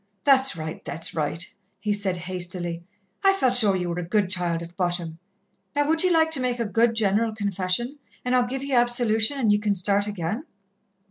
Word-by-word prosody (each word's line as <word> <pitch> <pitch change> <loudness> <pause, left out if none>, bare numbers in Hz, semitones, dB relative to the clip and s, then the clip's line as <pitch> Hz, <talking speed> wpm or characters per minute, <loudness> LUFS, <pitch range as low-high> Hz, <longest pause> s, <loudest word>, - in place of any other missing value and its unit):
"That's 270 -1 +4
right, 160 0 -6
that's 165 - -4
right," 160 +2 -1 0.3
he 210 -1 0
said 200 -3 -1
hastily. 175 -1 -4 0.4
"I 390 0 +6
felt 260 -10 +1
sure 210 -5 +5
ye 180 -1 -2
were 175 0 -3
a - - -3
good 190 +2 0
child 175 -2 -1
at 170 +1 -11
bottom. 175 -3 -2 0.6
Now 290 0 +2
would 320 +2 +2
ye 365 - +3
like 320 -2 +3
to 295 - +3
make 250 -1 -1
a 235 - 0
good 230 +2 +2
general 220 +1 +2
Confession, 205 +6 -1 0.3
and 250 0 +1
I'll 250 -1 +3
give 265 +2 -4
ye 275 -1 -4
absolution, 240 0 +3
and 225 -5 +3
ye 205 - +3
can 210 -1 0
start 200 +2 +2
again?" 205 - -3
210 Hz, 200 wpm, -24 LUFS, 180-250 Hz, 0.6 s, I